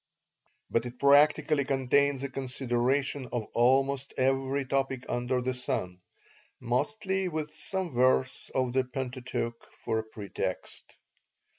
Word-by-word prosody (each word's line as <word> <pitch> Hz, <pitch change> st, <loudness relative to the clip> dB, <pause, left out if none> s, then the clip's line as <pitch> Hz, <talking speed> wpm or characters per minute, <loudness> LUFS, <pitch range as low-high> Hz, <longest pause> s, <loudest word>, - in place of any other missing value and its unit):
But 115 Hz, +1 st, +1 dB
it 120 Hz, +1 st, -10 dB
practically 145 Hz, +1 st, +5 dB
contains 135 Hz, +1 st, +2 dB
a 140 Hz, -, -2 dB
consideration 130 Hz, +1 st, -1 dB
of 120 Hz, -3 st, -2 dB
almost 135 Hz, +3 st, +2 dB
every 135 Hz, +1 st, +1 dB
topic 135 Hz, -1 st, -1 dB
under 125 Hz, +1 st, -1 dB
the 130 Hz, +1 st, 0 dB
sun, 90 Hz, -7 st, -3 dB, 0.6 s
mostly 190 Hz, -, -1 dB
with 155 Hz, -3 st, -3 dB
some 185 Hz, +3 st, -3 dB
verse 130 Hz, +1 st, +2 dB
of 130 Hz, -2 st, +1 dB
the 130 Hz, 0 st, +3 dB
Pentateuch 125 Hz, -2 st, -4 dB, 0.2 s
for 110 Hz, -, 0 dB
a -, -, -3 dB
pretext. 105 Hz, -3 st, -6 dB
130 Hz, 120 wpm, -29 LUFS, 125-140 Hz, 0.6 s, practically